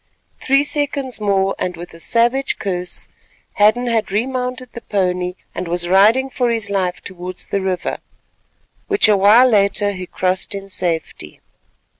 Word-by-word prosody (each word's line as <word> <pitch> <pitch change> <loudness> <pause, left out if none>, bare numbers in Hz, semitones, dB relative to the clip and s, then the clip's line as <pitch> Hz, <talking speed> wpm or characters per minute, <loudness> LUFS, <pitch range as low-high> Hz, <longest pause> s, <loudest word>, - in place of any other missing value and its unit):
Three 275 +1 +3
seconds 285 -5 -1
more, 195 -1 +1
and 180 -1 -3
with 175 0 -9
a 165 - -12
savage 240 +8 +1
curse, 180 -3 -3 0.5
Hadden 215 +4 +4
had 225 -4 0
remounted 250 +3 -2
the 235 - -8
pony 180 -3 -1 0.2
and 185 - -5
was 175 +1 0
riding 220 +9 +4
for 245 -2 0
his 225 -3 -1
life 185 -2 -1
towards 180 0 -6
the 200 - -2
river, 185 -2 -2 0.9
which 405 - +3
a 210 - +5
while 210 +6 +6
later 205 -2 +2
he 185 -2 -7
crossed 185 +2 -2
in 195 0 -7
safety. 165 - -4
200 Hz, 150 wpm, -18 LUFS, 185-245 Hz, 0.9 s, while